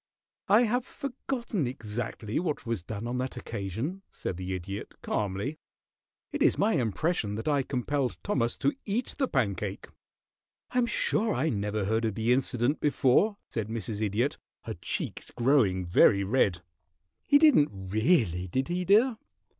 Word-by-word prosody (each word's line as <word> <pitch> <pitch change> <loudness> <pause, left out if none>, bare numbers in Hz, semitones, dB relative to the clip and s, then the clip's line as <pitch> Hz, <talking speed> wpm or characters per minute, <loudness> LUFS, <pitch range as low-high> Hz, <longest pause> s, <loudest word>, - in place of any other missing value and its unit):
"I 215 +5 +6
have 245 +2 +1
forgotten 240 - -3
exactly 110 -1 -4
what 160 -6 -2
was 115 -5 -2
done 105 +4 -6
on 125 +1 -2
that 130 0 -3
occasion," 115 - -4
said 95 - -5
the 95 +1 -3
Idiot, 100 +3 -6
calmly. 105 +10 -2 0.7
"It - - -4
is - - +4
my 210 +3 +3
impression 120 - 0
that 110 - -5
I 145 -2 +3
compelled 130 - -1
Thomas 120 -2 0
to 140 +1 +1
eat 225 +5 -2
the 270 - +2
pancake." 100 - -2 0.8
"I 250 - +1
am 240 - +2
sure 220 -1 +1
I 160 - +1
never 105 -3 -1
heard 110 +3 +1
of 110 -3 -1
the 115 +2 +2
incident 130 +2 +1
before," 150 - +3
said 110 -3 -3
Mrs. 110 -1 -3
Idiot, 110 +6 0 0.2
her - - -4
cheeks - - -4
growing 115 -8 +2
very 100 +3 +5
red. 95 -5 +1 0.6
"He 285 - +7
didn't 285 - +6
really, 95 - +1
did 130 - -1
he, 180 +1 -1
dear?" 220 +6 +4
120 Hz, 155 wpm, -28 LUFS, 105-160 Hz, 0.8 s, He